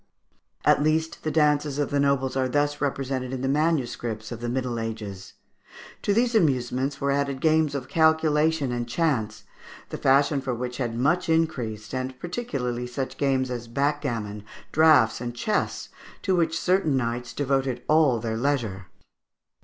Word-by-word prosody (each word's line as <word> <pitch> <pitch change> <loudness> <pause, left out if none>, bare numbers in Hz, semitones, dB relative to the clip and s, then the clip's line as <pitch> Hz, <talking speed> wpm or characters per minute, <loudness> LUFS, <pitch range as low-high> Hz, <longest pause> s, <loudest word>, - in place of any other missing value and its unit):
At - - +5
least 160 +2 0
the 155 - -2
dances 150 -2 +2
of 145 -1 -1
the 145 - +1
nobles 140 -2 +1
are 130 -1 +1
thus 145 +2 0
represented 135 -2 -2
in 130 - -3
the - - 0
MSS. 130 -7 -1
of 120 - -5
the 120 - -2
Middle 125 -1 -2
Ages. 105 -4 -6 0.7
To - - 0
these 235 +3 +2
amusements 135 - +1
were 140 0 0
added 140 -1 -1
games 155 -1 +2
of 130 -2 -4
calculation 160 -2 +2
and 120 -1 -3
chance, 115 -8 -1 0.5
the - - -6
fashion 140 +1 +3
for 130 -2 -2
which 125 +1 -4
had 120 -3 -2
much 165 +8 +1
increased, 125 -10 -1
and 130 0 -4
particularly 135 - -3
such 130 +2 -4
games 130 -2 +1
as 120 -1 -5
backgammon, 120 -6 -2 0.3
draughts, 155 -8 +5
and 120 -1 -4
chess, 210 - -1 0.3
to 190 -2 +2
which 165 -1 +1
certain 180 -7 +2
knights 120 0 -2
devoted 135 -1 -1
all 150 -5 +4
their 110 0 -3
leisure. 115 -8 -1
135 Hz, 155 wpm, -25 LUFS, 120-150 Hz, 0.7 s, At